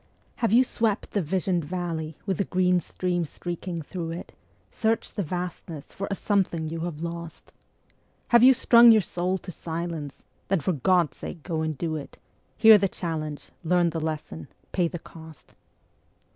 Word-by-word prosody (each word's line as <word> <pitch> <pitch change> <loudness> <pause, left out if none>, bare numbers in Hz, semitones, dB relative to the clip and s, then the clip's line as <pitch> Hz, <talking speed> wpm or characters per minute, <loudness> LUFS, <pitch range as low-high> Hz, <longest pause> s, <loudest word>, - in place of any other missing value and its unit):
Have 230 -5 +1
you 240 +3 +6
swept 225 -4 -1
the 205 - 0
visioned 180 +1 0
valley 160 -2 -4
with 190 -4 -1
the - - +3
green 180 0 +2
stream 175 +1 -2
streaking 175 +1 -5
through 170 +1 -5
it, 170 +2 -7 0.4
Searched 225 0 -1
the 205 - -1
Vastness 175 -3 -5
for 195 - -4
a 200 - -1
something 185 -6 0
you 165 +1 -4
have 165 -1 -4
lost? 170 -1 -7 0.8
Have 240 -1 +6
you 255 +2 +9
strung 235 -2 +7
your 220 -1 +6
soul 180 +3 -1
to 180 - -9
silence? 165 -4 -5 0.2
Then 195 -1 +2
for 180 +5 0
God's 170 +3 +2
sake 165 - -8
go 165 -3 -2
and 155 -2 -2
do 160 0 -2
it; 145 - -9 0.4
Hear 220 -2 +8
the 195 0 +1
challenge, 155 -5 -4
learn 175 0 +2
the 165 - -3
lesson, 155 - -5 0.2
pay 175 -2 +1
the 175 - -5
cost. 160 -2 -14
175 Hz, 170 wpm, -26 LUFS, 160-190 Hz, 0.8 s, you